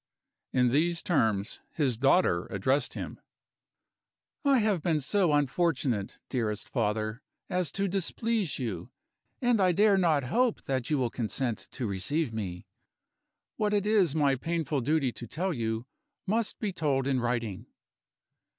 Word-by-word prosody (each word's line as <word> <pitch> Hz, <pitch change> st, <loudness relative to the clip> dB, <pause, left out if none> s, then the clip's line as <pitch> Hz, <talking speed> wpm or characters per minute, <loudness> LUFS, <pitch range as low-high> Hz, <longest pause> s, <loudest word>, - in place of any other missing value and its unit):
In 125 Hz, -1 st, +3 dB
these 170 Hz, +6 st, +2 dB
terms, 110 Hz, -, +1 dB
his 135 Hz, -6 st, +1 dB
daughter 130 Hz, -, +3 dB
addressed 130 Hz, +8 st, 0 dB
him: -, -, -6 dB, 1.2 s
"I 280 Hz, -2 st, +5 dB
have 210 Hz, -7 st, +2 dB
been 160 Hz, -1 st, +1 dB
so 175 Hz, +4 st, +2 dB
unfortunate, 145 Hz, -, 0 dB
dearest 110 Hz, -5 st, -2 dB
father, 110 Hz, 0 st, -1 dB, 0.3 s
as 180 Hz, -2 st, 0 dB
to 200 Hz, 0 st, 0 dB
displease 195 Hz, -, -1 dB
you, 100 Hz, -10 st, -4 dB, 0.5 s
and 240 Hz, -4 st, +3 dB
I 185 Hz, -1 st, +4 dB
dare 205 Hz, +1 st, +4 dB
not 160 Hz, -6 st, +3 dB
hope 235 Hz, -, +1 dB
that 130 Hz, -3 st, -2 dB
you 150 Hz, -, +2 dB
will 125 Hz, -3 st, 0 dB
consent 120 Hz, 0 st, -2 dB
to 130 Hz, -, -3 dB
receive 115 Hz, -, -1 dB
me. 90 Hz, -5 st, -5 dB, 0.9 s
What 210 Hz, -1 st, +1 dB
it 205 Hz, -1 st, +1 dB
is 200 Hz, -8 st, +3 dB
my 145 Hz, -3 st, +3 dB
painful 155 Hz, 0 st, -1 dB
duty 140 Hz, 0 st, +1 dB
to 120 Hz, +2 st, -8 dB
tell 180 Hz, -, -2 dB
you, 110 Hz, -2 st, -2 dB, 0.4 s
must 220 Hz, +2 st, 0 dB
be 210 Hz, -5 st, -2 dB
told 145 Hz, -6 st, 0 dB
in 135 Hz, -2 st, +1 dB
writing. 120 Hz, -5 st, -2 dB
145 Hz, 140 wpm, -29 LUFS, 120-180 Hz, 1.2 s, I